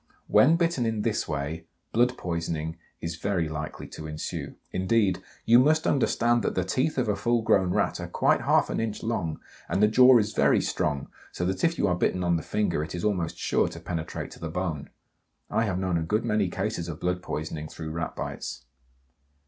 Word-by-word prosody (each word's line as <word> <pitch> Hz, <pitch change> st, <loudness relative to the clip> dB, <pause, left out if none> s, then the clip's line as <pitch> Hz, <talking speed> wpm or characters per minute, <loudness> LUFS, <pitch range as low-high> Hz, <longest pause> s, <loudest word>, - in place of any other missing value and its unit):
When 155 Hz, +5 st, +5 dB
bitten 170 Hz, -6 st, +1 dB
in 110 Hz, -2 st, -1 dB
this -, -, 0 dB
way 75 Hz, +4 st, -4 dB, 0.2 s
blood 125 Hz, +2 st, +2 dB
poisoning 85 Hz, -1 st, -3 dB, 0.2 s
is 85 Hz, 0 st, -4 dB
very 90 Hz, -3 st, 0 dB
likely 75 Hz, 0 st, -5 dB
to 80 Hz, -, -8 dB
ensue. 75 Hz, 0 st, -5 dB, 0.2 s
Indeed, 95 Hz, 0 st, +1 dB, 0.2 s
you 120 Hz, +2 st, +7 dB
must 155 Hz, +4 st, +3 dB
understand 120 Hz, -3 st, +2 dB
that -, -, -1 dB
the 95 Hz, -, +1 dB
teeth 130 Hz, -, 0 dB
of 125 Hz, -3 st, +1 dB
a 105 Hz, -, +1 dB
full 115 Hz, +3 st, +1 dB
grown 95 Hz, -4 st, +3 dB
Rat -, -, 0 dB
are -, -, -4 dB
quite -, -, +2 dB
half -, -, +3 dB
an -, -, -1 dB
inch 110 Hz, -2 st, -3 dB
long, 95 Hz, -9 st, -2 dB, 0.3 s
and 95 Hz, -, 0 dB
the 105 Hz, -, +6 dB
jaw 125 Hz, +3 st, +7 dB
is 105 Hz, -1 st, 0 dB
very -, -, +4 dB
strong, 75 Hz, -3 st, -1 dB, 0.2 s
so 90 Hz, -, -3 dB
that 95 Hz, 0 st, -2 dB
if 165 Hz, 0 st, +2 dB
you -, -, +2 dB
are 90 Hz, -, +2 dB
bitten 90 Hz, +1 st, 0 dB
on 85 Hz, -1 st, +2 dB
the 80 Hz, -, -1 dB
finger 85 Hz, -4 st, 0 dB
it 80 Hz, +2 st, -6 dB
is 85 Hz, -, -4 dB
almost 90 Hz, -6 st, -1 dB
sure -, -, +1 dB
to -, -, -7 dB
penetrate 80 Hz, -3 st, -5 dB
to -, -, -12 dB
the 85 Hz, -, -4 dB
bone. 80 Hz, -4 st, -3 dB, 0.6 s
I 115 Hz, -, +2 dB
have 95 Hz, -4 st, -1 dB
known 90 Hz, -2 st, 0 dB
a -, -, -3 dB
good 105 Hz, +8 st, 0 dB
many 105 Hz, -4 st, +1 dB
cases 85 Hz, 0 st, -3 dB
of 80 Hz, -1 st, -6 dB
blood 90 Hz, 0 st, -1 dB
poisoning 75 Hz, -2 st, -4 dB
through 80 Hz, 0 st, -7 dB
Rat 80 Hz, 0 st, -4 dB
bites. 65 Hz, -, -5 dB
90 Hz, 205 wpm, -27 LUFS, 80-115 Hz, 0.6 s, you